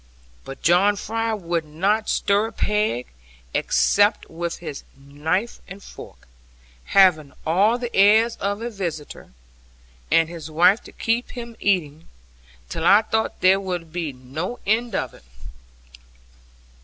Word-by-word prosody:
But 135 - -10
John 185 +5 +4
Fry 225 +2 -2
would 170 -4 -2
not 195 +8 -1
stir 205 +2 +1
a - - -9
peg, 210 - -1 0.5
except 205 +1 +2
with 170 +1 -4
his 155 -5 -7 0.2
knife 155 +10 -3
and 195 +1 -11
fork, - - -13 0.6
having 170 -7 +4
all 200 +9 +3
the 240 -1 -5
airs 220 +4 +5
of 205 +2 -3
a 240 - -4
visitor, 165 - -6 0.8
and 165 -1 +4
his 165 -2 -8
wife 175 +7 +4
to - - -12
keep 230 +2 -2
him 235 -2 -8
eating, 165 -6 -1 0.6
till 160 - -5
I 200 +5 +6
thought 220 +1 -2
there 190 +1 +5
would 175 -4 -5
be 170 -4 -3
no 140 - -6
end 225 +1 0
of - - -2
it. - - -16
190 Hz, 135 wpm, -22 LUFS, 160-215 Hz, 0.8 s, I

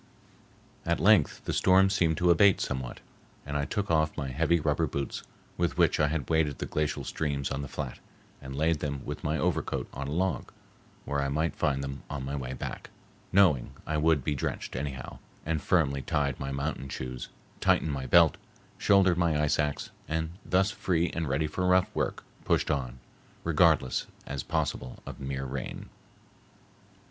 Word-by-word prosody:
At 85 0 0
length 95 -4 +4
the - - -1
storm 95 +1 +5
seemed 85 -6 +2
to 90 0 +4
abate 100 +3 +5
somewhat, 65 -2 -4 0.4
and 70 0 -5
I 70 0 +1
took 100 +6 -2
off 80 -1 +2
my 70 -3 -2
heavy 80 +6 +2
rubber 75 +1 +1
boots, 70 0 -3 0.4
with 85 -1 0
which - - +3
I 75 - +4
had 75 -3 -2
waded 80 -3 +1
the - - -3
glacial 75 -1 -1
streams 70 -3 -2
on 70 - -2
the 70 - -5
flat, - - -5 0.4
and 65 0 -7
laid 80 +2 +2
them 70 -3 -4
with - - -5
my - - 0
overcoat - - -1
on 70 +1 -4
a - - -4
log, 85 -3 -1 0.5
where 70 0 -1
I 70 - 0
might 80 +4 0
find 70 -2 0
them 70 0 -5
on 70 -2 -4
my 70 +2 -3
way 65 -2 -4
back, 65 - -6 0.4
knowing 90 -10 +4
I 80 - -1
would 75 -2 +3
be 75 - 0
drenched 70 - -3
anyhow, 65 -2 -5 0.3
and 80 -1 -1
firmly 70 -4 +2
tied 70 -2 -1
my 70 0 -3
mountain 70 0 -3
shoes, 65 -1 -5 0.3
tightened 80 - +2
my 65 -2 -4
belt, - - +6 0.4
shouldered 95 -3 +4
my 85 -3 +2
ice 75 -1 +2
axe, 75 -1 -1 0.2
and, 80 0 -1
thus 95 +3 +2
free 85 -4 0
and 80 -4 -2
ready 70 +4 +1
for 75 +4 -2
rough 90 0 +3
work, - - -1 0.2
pushed - - +1
on, 65 -4 -2 0.5
regardless 65 - +3 0.2
as 70 -1 -4
possible 65 - -2
of - - -8
mere 65 -1 -3
rain. 65 - -5
75 Hz, 175 wpm, -29 LUFS, 70-80 Hz, 0.5 s, belt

